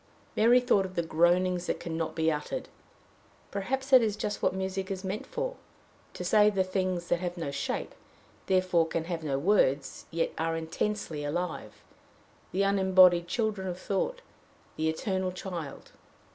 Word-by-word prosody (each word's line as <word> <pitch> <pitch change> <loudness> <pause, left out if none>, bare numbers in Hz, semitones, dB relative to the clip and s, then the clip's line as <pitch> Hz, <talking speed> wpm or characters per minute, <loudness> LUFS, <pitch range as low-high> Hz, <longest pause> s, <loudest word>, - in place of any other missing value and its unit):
Mary 235 +3 +6
thought 245 -6 +3
of 185 -1 -7
the 170 - +1
"groanings 175 +2 +2
that - - -1
can 165 -1 -5
not 165 -1 -3
be 160 0 +2
uttered." 155 - -4 0.8
Perhaps 265 +7 -3
that 260 -2 +9
is 215 -3 0
just 210 -1 -3
what - - +3
music 190 0 -3
is 190 -1 -4
meant 195 +2 -4
for - - -3 0.6
to - - -5
say 210 +3 +5
the 195 -2 +1
things 185 -2 -2
that 175 - +2
have 175 0 -4
no 160 -4 -3
shape, 140 - -3 0.5
therefore 185 -3 +3
can 165 0 -2
have 165 -1 -4
no 140 -3 -1
words, 140 -5 +1
yet 165 0 -1
are 165 0 0
intensely 165 -1 -3
alive 175 +4 -4 0.7
the 195 +2 +1
unembodied 185 -3 +5
children 210 -1 -1
of 180 -1 -3
thought, - - -2 0.5
the 160 0 0
eternal 185 +3 -1
child. 180 -5 -7
185 Hz, 160 wpm, -29 LUFS, 165-200 Hz, 0.8 s, that